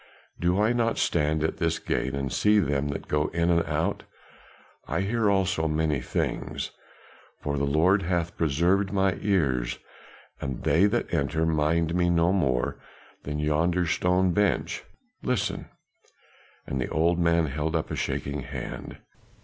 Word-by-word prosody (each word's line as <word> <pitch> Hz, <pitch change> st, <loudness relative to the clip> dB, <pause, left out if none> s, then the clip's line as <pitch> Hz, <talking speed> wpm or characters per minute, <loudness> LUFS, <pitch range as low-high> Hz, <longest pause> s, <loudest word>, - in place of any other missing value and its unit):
Do 90 Hz, +3 st, +1 dB
I 110 Hz, +3 st, +3 dB
not 115 Hz, -1 st, +1 dB
stand 75 Hz, -1 st, +1 dB
at 80 Hz, -, -1 dB
this -, -, 0 dB
gate 65 Hz, +1 st, -2 dB
and 70 Hz, -2 st, -3 dB
see 105 Hz, 0 st, +4 dB
them 75 Hz, -7 st, +1 dB
that 70 Hz, -, -5 dB
go 75 Hz, 0 st, +1 dB
in 85 Hz, +1 st, +1 dB
and 85 Hz, -1 st, +3 dB
out? -, -, -1 dB, 0.9 s
I -, -, -1 dB
hear 110 Hz, +2 st, +1 dB
also 95 Hz, -4 st, +1 dB
many 75 Hz, -2 st, 0 dB
things -, -, -3 dB, 0.7 s
for 70 Hz, -1 st, -2 dB
the 70 Hz, 0 st, 0 dB
Lord 85 Hz, +8 st, +3 dB
hath 85 Hz, -1 st, -1 dB
preserved 85 Hz, +6 st, +1 dB
my 95 Hz, -2 st, +2 dB
ears, 70 Hz, -, +1 dB, 0.6 s
and 65 Hz, -2 st, -4 dB
they 85 Hz, +7 st, +4 dB
that 120 Hz, -2 st, -1 dB
enter 80 Hz, +1 st, +1 dB
mind 80 Hz, +1 st, +1 dB
me 90 Hz, 0 st, +2 dB
no 85 Hz, +1 st, +3 dB
more 65 Hz, -10 st, 0 dB, 0.5 s
than 75 Hz, +1 st, -3 dB
yonder 85 Hz, +4 st, +1 dB
stone 90 Hz, +3 st, +2 dB
bench 105 Hz, +1 st, 0 dB, 0.4 s
listen!" -, -, -2 dB, 1.0 s
and 65 Hz, -1 st, -3 dB
the -, -, -2 dB
old 85 Hz, +2 st, +2 dB
man 85 Hz, -1 st, +3 dB
held 75 Hz, +3 st, -2 dB
up 80 Hz, -, -1 dB
a -, -, -1 dB
shaking 70 Hz, +1 st, -2 dB
hand. -, -, -7 dB
85 Hz, 150 wpm, -26 LUFS, 75-95 Hz, 1.0 s, see